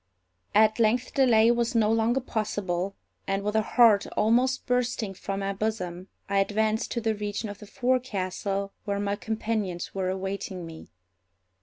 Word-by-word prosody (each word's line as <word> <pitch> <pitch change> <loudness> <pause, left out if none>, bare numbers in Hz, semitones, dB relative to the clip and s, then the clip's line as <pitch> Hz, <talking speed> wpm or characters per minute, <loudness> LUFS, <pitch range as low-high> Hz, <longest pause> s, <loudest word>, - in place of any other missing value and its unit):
At 215 +1 +5
length 230 +3 +2
delay 235 -4 +5
was 235 +1 0
no 220 -1 +3
longer 225 +3 +2
possible, 200 -5 -2 0.3
and, 195 0 -1
with 210 +1 -2
a 220 - +4
heart 215 -2 +4
almost 250 +4 +2
bursting 245 -5 0
from 195 +1 -4
my 195 0 -1
bosom, 190 -4 -3 0.2
I 200 0 +1
advanced 215 +2 +1
to 235 - -2
the 220 -1 +1
region 210 +1 -4
of 205 -1 -8
the 210 - -11
forecastle, 200 -6 -1
where 200 -1 -1
my 200 0 -1
companions 215 -5 -3
were 190 -1 -1
awaiting 190 -1 -4
me. 165 -1 -11
210 Hz, 155 wpm, -27 LUFS, 195-230 Hz, 0.3 s, At